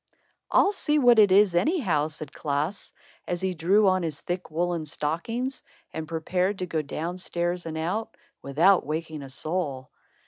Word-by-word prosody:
"I'll 400 - +4
see 300 -6 +1
what 245 -5 +6
it 205 -3 +6
is, 195 -1 +5
anyhow," 175 - +1
said 155 -2 -8
Klaas, 150 +6 -3 0.4
as 175 - -2
he 190 -1 0
drew 195 +5 +3
on 185 0 +3
his 155 -4 -3
thick 175 0 -4
woolen 170 +1 -1
stockings 200 - -3 0.3
and 160 -1 -5
prepared 180 +4 -1
to 185 - -3
go 165 -3 -1
down 165 +5 -5
stairs 175 -1 -2
and 160 -1 -4
out, 180 +8 -3 0.2
without 165 +8 +4
waking 155 0 -4
a 135 - -9
soul. 140 -2 -3
175 Hz, 165 wpm, -26 LUFS, 155-195 Hz, 0.4 s, what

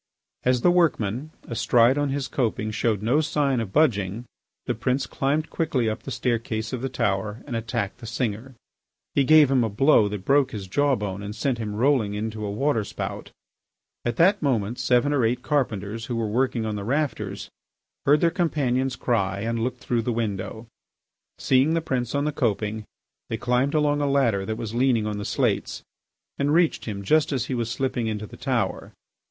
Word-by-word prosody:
As 125 -1 +2
the 175 - +5
workman, 145 - +1 0.2
astride 120 +2 +3
on 145 -1 0
his 135 -1 -2
coping, 110 -4 -1
showed 110 -2 0
no 130 +8 +3
sign 145 -4 +1
of 110 -4 -4
budging, 110 -6 +1 0.4
the - - 0
prince 130 +2 -1
climbed 150 +4 -1
quickly 140 -8 0
up 110 - -2
the - - -8
staircase 115 -3 -2
of 125 - -3
the 135 - -2
tower 105 -1 -1
and 125 - -5
attacked 115 -1 -3
the 115 - -9
singer. 120 +2 -3 0.6
He 140 - +3
gave 150 0 +6
him 130 -3 +3
a 110 - 0
blow 115 +1 +4
that 100 -2 -6
broke 140 -1 +3
his 100 -3 -5
jaw 145 +8 +2
bone 100 -3 -4
and 105 +1 -6
sent 120 +1 -1
him 105 -2 -4
rolling 115 -4 +2
into 110 0 -4
a 105 - -2
water 115 +2 0
spout. - - -6 0.7
At 120 -1 -1
that 190 - +4
moment 120 -5 0
seven 125 +4 +2
or 135 -4 +2
eight 120 +2 0
carpenters, 115 -6 -1
who 120 - -3
were 115 -1 -1
working 115 +1 0
on 110 -1 -2
the 100 - -4
rafters, 110 -6 -2 0.6
heard 145 +2 +5
their 170 - +3
companion's 135 -7 0
cry 100 -6 0
and 115 +1 -1
looked 125 +2 -3
through 120 -2 0
the 120 - -2
window. 110 -1 -3 0.7
Seeing 135 +5 +3
the - - +2
prince 130 -5 -2
on 140 +1 +1
the 150 - 0
coping 110 -5 -1 0.4
they 115 - -2
climbed 125 +5 +1
along 145 -1 +2
a 145 - +1
ladder 115 -9 +2
that 110 - -2
was 110 -1 -5
leaning 120 -3 +2
on 105 -1 -3
the 100 - -5
slates - - -1 0.6
and 145 +2 +2
reached 170 -1 +2
him 100 -3 -5
just 155 +10 +3
as 130 -4 -1
he 130 - -4
was 120 -2 -1
slipping 125 -1 -1
into 110 -1 -3
the - - -12
tower. 125 -7 -2
120 Hz, 190 wpm, -24 LUFS, 110-140 Hz, 0.7 s, gave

